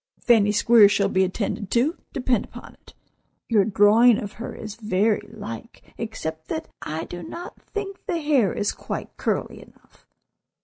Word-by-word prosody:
"Fanny 215 -4 +4
Squeers 210 0 +6
shall 200 -1 +2
be 190 -1 +2
attended 200 +1 -3
to, 270 +9 +2 0.2
depend 250 -5 0
upon - - -12
it. - - -20 0.5
Your 215 -4 +4
drawing 215 +3 +5
of 205 - -5
her 230 +3 -7
is 215 -2 -7
very 215 -1 +1
like, 215 - -9
except 160 -8 -5
that 160 - -4
I 155 +1 -4
do 175 - -8
not 340 - -9
think 405 -1 -7
the 360 -4 0
hair 280 - +2
is 205 - -1
quite - - -6
curly - - -2
enough. - - -22
215 Hz, 160 wpm, -24 LUFS, 200-240 Hz, 0.5 s, Squeers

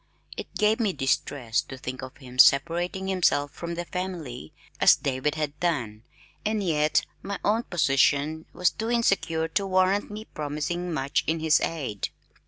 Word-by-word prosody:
It - - -8
gave 215 +1 +2
me 210 -5 +1
distress 135 -4 0
to 130 - -10
think 130 0 -6
of 130 0 -9
him 125 -2 -11
separating 170 +8 +4
himself 170 -6 +2
from 170 +2 -6
the 175 +1 -4
family 165 - -5 0.3
as - - +7
David 140 +2 -1
had 150 -1 -3
done, 120 -12 -1 0.4
and 215 -1 0
yet 155 -4 +2 0.2
my 200 0 -4
own 215 +3 +3
position 150 - +1
was 180 -1 +2
too 225 +1 -4
insecure 195 -9 +1
to 195 +4 0
warrant 185 +2 +2
me 210 +1 -7
promising 155 +4 -3
much 140 -2 0
in 160 +1 +1
his 160 -1 +3
aid. 135 -11 -3
160 Hz, 160 wpm, -26 LUFS, 140-185 Hz, 0.4 s, as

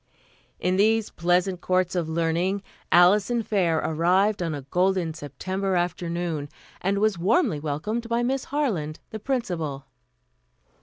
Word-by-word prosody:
In 185 +1 +1
these 220 +2 +2
pleasant 180 +1 +1
courts 185 -1 +1
of 170 -3 -1
learning 170 +4 0 0.3
Alison 205 +7 +5
Fair 185 -6 +1
arrived 180 +7 +2
on 165 -3 -1
a 140 - -7
golden 180 +3 +1
September 185 +6 -3
afternoon, 175 -3 -2 0.3
and 195 +2 0
was 210 -3 +1
warmly 185 - +2
welcomed 210 +11 -3
by 235 +1 +1
Miss 265 +2 -1
Harland, 205 - -2
the 220 - -5
Principal. 175 - -3
180 Hz, 125 wpm, -25 LUFS, 165-210 Hz, 0.3 s, Alison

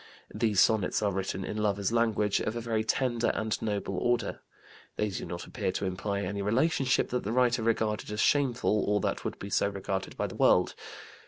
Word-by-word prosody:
These 105 -3 +1
sonnets 110 -2 +3
are 100 - +2
written 95 0 -3
in 105 - -4
lover's 100 -2 0
language 110 -3 +2
of 110 - -2
a - - -2
very 115 -1 -1
tender 120 0 0
and 110 0 -1
noble 100 -3 -2
order. 120 +2 0 0.6
They 105 - 0
do 95 - -5
not 85 0 -6
appear - - -2
to 100 - -2
imply 100 +2 -2
any 100 +2 -3
relationship 130 +5 +2
that 125 - -1
the 105 - -3
writer 125 -1 +2
regarded 110 -2 0
as 105 - -4
shameful 125 -7 +2
or 105 0 +2
that - - -2
would - - -4
be 100 - -7
so 100 - +2
regarded 95 -1 -4
by - - 0
the - - -6
world. - - +3
105 Hz, 195 wpm, -29 LUFS, 100-115 Hz, 0.6 s, sonnets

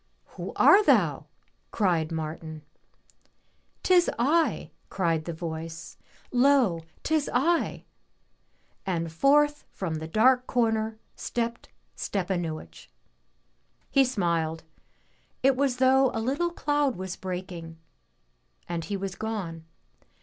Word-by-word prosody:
'* - - -43
*'Who - - -5
are 415 +2 +7
thou?'' - - +3 0.4
cried 170 -6 +1
Martin. 155 -1 -5 0.6
" - - -41
Tis 360 -2 +4
I," 310 +8 +1 0.2
cried 165 -4 0
the 170 - -3
voice, 160 0 -6 0.2
" - - -30
lo, 250 -9 +3 0.2
'tis 310 -2 +1
I 330 +7 +1 0.5
!" - - -42
And 165 0 -3
forth 295 - +3
from 180 -4 -4
the 160 0 -4
dark 250 +8 +3
comer 225 -2 0 0.2
stepped 235 0 -3 0.3
Stepanuich. 170 - -4 1.0
He 275 - +5
smiled; 170 -9 -1 0.8
it 270 0 +5
was 275 -1 +1
as - - -11
though 265 0 +4
a - - 0
little 280 +10 0
cloud 290 -6 0
was 185 0 -5
breaking 180 -3 -6 0.9
and 170 -2 -3
he 200 +4 -3
was 195 -1 -4
gone. 195 -7 -5
200 Hz, 120 wpm, -27 LUFS, 165-265 Hz, 1.0 s, are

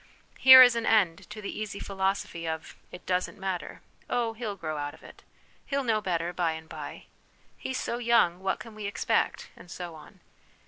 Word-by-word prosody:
Here 260 0 +11
is 245 -2 +5
an 230 -1 -2
end 195 -4 +2
to 210 0 -9
the 200 - -5
easy 215 -1 -5
philosophy 190 -3 -2
of, 160 0 -5 0.2
'It 180 - -11
doesn't 180 0 -1
matter,' 190 -2 -5 0.2
' - - -38
Oh, 235 -2 0
he'll 220 -3 -5
grow 155 -4 -5
out 145 0 -4
of - - -21
it,' - - -14 0.2
* - - -34
He'll 280 -1 -1
know 220 -3 +1
better 175 -2 -2
by 170 -2 0
and 160 0 -9
by,' - - -8 0.3
' - - -35
He's 260 0 -4
so 235 - -3
young, 230 -7 +3
what 190 0 -1
can 230 - -10
we 215 -1 -5
expect? 200 - -1
' - - -30
and 175 - -15
so 175 -1 -7
on. 155 -1 -14
195 Hz, 215 wpm, -28 LUFS, 175-225 Hz, 0.3 s, Here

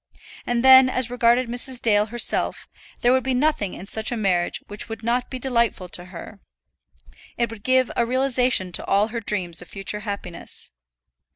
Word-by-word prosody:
And 240 +1 0
then, 260 0 +8
as 255 -2 0
regarded 245 +1 +3
Mrs. 245 +1 -2
Dale 210 -2 +2
herself, 240 +2 0 0.3
there 245 +1 +4
would 260 -1 +2
be 260 -1 -1
nothing 255 -8 0
in 185 - -9
such 220 +3 -1
a 240 - -2
marriage 185 -5 0
which 205 +2 -6
would 225 0 -7
not 245 +2 -1
be 260 - -5
delightful 235 -7 0
to 175 0 -6
her. 185 +3 -11 1.0
It 235 -1 0
would 225 -2 -10
give 255 -1 +2
a 235 - +2
realization 250 -5 +1
to - - -2
all 205 +3 +2
her 230 +1 -4
dreams 185 -6 -2
of 180 - -11
future 195 +1 -5
happiness. 200 -4 -7
235 Hz, 180 wpm, -23 LUFS, 205-250 Hz, 1.0 s, then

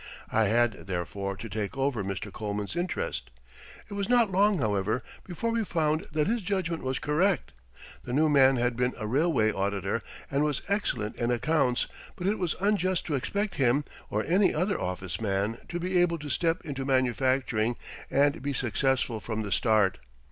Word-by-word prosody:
I 110 0 +3
had, 115 -1 +1
therefore, 100 +2 -3
to 115 - -6
take 105 +4 -4
over 135 -6 0
Mr. 100 +1 -4
Coleman's 105 +3 -3
interest. 185 - -2 0.6
It 205 - -9
was 200 -1 -2
not 240 -4 +4
long, 200 +2 +4
however, 105 - 0 0.2
before 195 +6 -2
we 230 0 +1
found 155 -4 0
that 155 -1 +1
his 230 +3 0
judgment 180 -4 -1
was 130 0 -1
correct. 175 +6 +1 0.5
The - - -6
new 150 +5 +3
man 135 -3 +6
had 120 0 +1
been 125 +1 0
a 110 - -4
railway 130 -2 +2
auditor, 100 +2 -1 0.3
and 140 +1 +2
was 150 -2 -1
excellent 130 - -1
in 120 -1 0
accounts, 125 +1 +2 0.3
but 180 - -5
it 205 +3 +1
was 180 -4 0
unjust 185 -2 +1
to 155 - -2
expect 200 +10 -2
him, 135 +1 +3 0.2
or 105 +1 0
any 190 +4 +3
other 185 +6 0
office 90 +1 -4
man, 100 +2 0
to 175 - -3
be 180 +1 +2
able 170 -1 +2
to 150 -1 -7
step 165 +4 0
into 135 -3 -4
manufacturing 130 -3 +1 0.3
and 140 +2 +2
be 140 +1 -2
successful 125 -1 0
from 110 0 -3
the 100 - -5
start. 105 -5 +3
135 Hz, 175 wpm, -28 LUFS, 110-175 Hz, 0.6 s, man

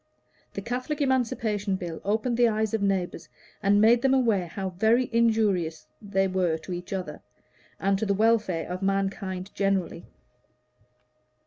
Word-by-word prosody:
The 200 - -4
Catholic 255 +6 -3
Emancipation 225 -7 0
Bill 175 -3 -6
opened 220 +4 0
the 240 0 +4
eyes 220 -1 0
of 220 - 0
neighbors 195 -3 -1 0.3
and 205 0 +3
made 230 +3 +5
them 270 0 +3
aware 220 -9 +2
how 190 +2 -4
very 225 +7 +2
injurious 205 - +1 0.2
they 195 -1 0
were 180 -3 0
to 180 +3 -7
each 175 0 -7
other 190 -2 -4 0.6
and 195 0 +1
to 220 - -1
the 200 - +2
welfare 215 -6 +1
of 180 +1 -5
mankind 195 -1 -2
generally. 195 -4 -1
200 Hz, 145 wpm, -26 LUFS, 185-225 Hz, 0.6 s, made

